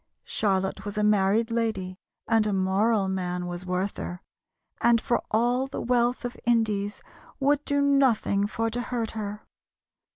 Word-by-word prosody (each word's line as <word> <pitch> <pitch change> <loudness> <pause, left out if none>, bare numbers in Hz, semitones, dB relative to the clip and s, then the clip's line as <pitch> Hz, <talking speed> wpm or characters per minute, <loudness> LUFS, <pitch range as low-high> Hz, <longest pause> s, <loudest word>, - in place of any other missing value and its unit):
Charlotte 195 -1 -1
was 205 +1 -6
a 210 - +1
married 210 +2 +3
lady, 205 -5 -2 0.3
And 225 -2 +3
a 210 - 0
moral 195 +2 +2
man 180 -1 -2
was 175 +1 -6
Werther, 180 -1 -3 0.6
And 235 -1 +5
for 240 - 0
all 245 +4 +1
the 270 - -5
wealth 245 0 +1
of 245 0 -4
Indies 215 -4 0 0.4
Would 285 +1 +2
do 285 -1 +1
nothing 255 -8 +3
for 225 +1 -2
to 245 +2 -2
hurt 235 -2 -3
her. 210 -1 -6
215 Hz, 150 wpm, -26 LUFS, 195-240 Hz, 0.6 s, And